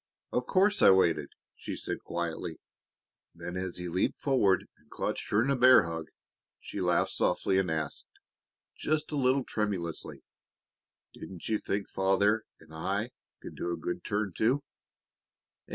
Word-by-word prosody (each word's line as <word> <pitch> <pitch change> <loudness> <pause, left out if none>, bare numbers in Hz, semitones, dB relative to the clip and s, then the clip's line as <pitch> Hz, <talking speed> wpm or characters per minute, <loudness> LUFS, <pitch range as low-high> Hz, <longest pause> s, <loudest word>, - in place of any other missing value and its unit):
"Of 125 0 -1
course 200 +2 +3
I - - +8
waited!" 85 -5 +4 0.3
she - - -6
said - - -4
quietly. 85 -1 -3 0.8
Then, 90 - -6
as 90 -1 -3
he 90 0 -4
leaped 90 +2 0
forward 105 -10 +3
and - - -29
clutched - - -3
her 105 +2 +3
in 135 - +1
a - - +3
bear 130 -2 +7
hug, 80 -1 -5 0.5
she - - -6
laughed - - +2
softly 95 +1 +1
and 95 -2 0
asked, 80 -2 -3 0.7
just 155 0 -1
a - - -2
little 130 -1 +2
tremulously, 95 -9 -3 0.9
"Didn't 90 -3 -9
you 110 -1 +1
think 100 0 -2
Father 100 +3 +2
and 80 - -17
I 100 +8 -2 0.3
could - - -8
do 85 - -3
a 85 - -2
good 90 0 -4
turn, 105 -2 -1
too?" 130 +6 +2
95 Hz, 150 wpm, -30 LUFS, 85-120 Hz, 0.9 s, I